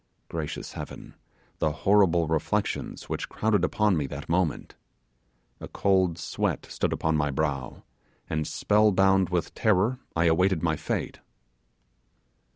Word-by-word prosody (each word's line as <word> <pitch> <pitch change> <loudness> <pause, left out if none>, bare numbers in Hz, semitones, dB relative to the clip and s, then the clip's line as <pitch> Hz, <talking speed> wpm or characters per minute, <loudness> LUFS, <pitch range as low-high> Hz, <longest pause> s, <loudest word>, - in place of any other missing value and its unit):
Gracious 80 -3 -5
heaven! - - -8 0.5
the 80 - +1
horrible 90 0 +3
reflections 80 -1 -2
which - - -4
crowded 110 -1 +1
upon 105 -3 +2
me 75 -4 -1
that 70 +1 -7
moment. 85 -2 -1 0.9
A - - -7
cold 95 -4 +1
sweat 85 - -2
stood - - -2
upon 80 0 0
my 75 -1 +1
brow, 70 -2 -3 0.4
and 80 -1 -2
spell 105 0 +3
bound 95 -1 +3
with 90 -2 -1
terror 110 +4 +2 0.2
I 85 +1 +2
awaited 85 +1 +2
my 80 -2 +2
fate! - - -3
85 Hz, 130 wpm, -27 LUFS, 80-95 Hz, 0.9 s, horrible